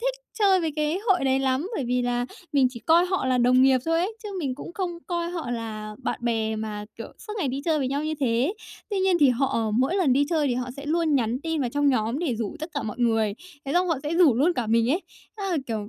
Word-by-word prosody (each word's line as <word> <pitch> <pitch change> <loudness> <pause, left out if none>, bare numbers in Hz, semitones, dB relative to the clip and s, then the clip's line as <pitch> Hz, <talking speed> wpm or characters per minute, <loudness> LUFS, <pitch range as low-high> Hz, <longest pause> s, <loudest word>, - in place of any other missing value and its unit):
thích - - 0 0.2
chơi 390 -3 +4
với 325 -2 -1
cái 305 +3 0
hội 365 -7 +3
đấy 265 0 +3
lắm, 270 +5 0
bởi 275 - -2
vì 250 +1 0
là 245 0 0 0.3
mình 275 -3 +4
chỉ 240 -2 -9
coi 335 +6 +4
họ 370 -6 -1
là 255 -1 +2
đồng 250 +1 +5
nghiệp 265 -1 +5
thôi 330 0 +1
ấy, 410 +5 -2
chứ 425 - -6
mình 275 -7 -2
cũng 290 - -9
không 350 -2 -3
coi 345 -1 -2
họ 335 -8 -4
là 215 -3 -5
bạn - - -2
bè 220 -2 0
mà 215 -1 -4
kiểu 230 - -5
suốt 425 - -8
ngày 320 -8 0
đi 270 +2 -3
chơi 320 -2 +2
với 265 -3 0
nhau 285 +3 -2
như 310 0 -1
thế. 255 - +1 0.4
Tuy 405 - 0
nhiên 380 -1 +3
thì 285 - +7
họ 245 -3 0
mỗi 265 - +2
lần 345 -9 +3
đi 280 +3 +3
chơi 310 -4 +2
thì 245 - 0
họ 250 0 -3
sẽ 280 +1 -8
luôn 320 0 +1
nhắn 245 -1 0
tin 325 0 -2
vào 250 -3 -1
trong 290 +2 +2
nhóm 235 -1 +1
để 315 -7 -1
rủ 225 +5 -4
tất 310 +3 -5
cả 285 - -1
mọi 215 - -5
người, 225 -4 +2 0.3
thế 275 - -3
xong 360 +2 +3
họ 325 -5 +1
sẽ 300 +2 -2
rủ 335 -8 +5
luôn 290 +9 +3
cả 245 -6 -2
mình 230 +2 +2
ấy. 335 +7 +1 0.4
Thế 400 - -4
là, 350 - +1
kiểu, 215 -3 -3
275 Hz, 275 wpm, -25 LUFS, 240-335 Hz, 0.4 s, thì